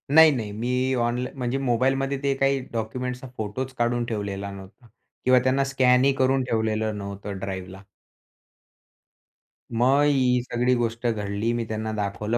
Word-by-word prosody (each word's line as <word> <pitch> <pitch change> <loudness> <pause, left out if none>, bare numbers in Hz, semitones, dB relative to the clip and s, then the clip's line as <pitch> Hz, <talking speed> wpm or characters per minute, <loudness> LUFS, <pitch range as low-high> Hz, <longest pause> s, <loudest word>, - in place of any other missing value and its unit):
नाही, 160 -1 +9
नाही. 115 -7 -3
मी 125 +4 -1
ऑनला 120 +2 -1
म्हणजे 125 0 -2
मोबाईलमध्ये 135 +2 +1
ते 140 -1 +2
काही 135 0 +2
डॉक्युमेंट्सचा 125 +3 -4
फोटोच 125 +5 -4
काढून 120 0 +1
ठेवलेला 100 -3 -4
नव्हता 100 +5 -12 0.4
किंवा 130 0 +6
त्यांना 130 +1 +2
स्कॅनही 135 0 +3
करून 130 0 +2
ठेवलेलं 110 -2 -1
नव्हतं 100 0 -6
ड्राईव्हला. 95 0 -6 1.9
मग 130 +5 +4
ही 130 -4 +3
सगळी 125 +1 +1
गोष्ट 115 0 -1
घडली. 105 0 -1
मी 120 -1 -2
त्यांना 110 0 -3
दाखवलं. 105 +2 -2
120 Hz, 135 wpm, -25 LUFS, 110-130 Hz, 1.9 s, नाही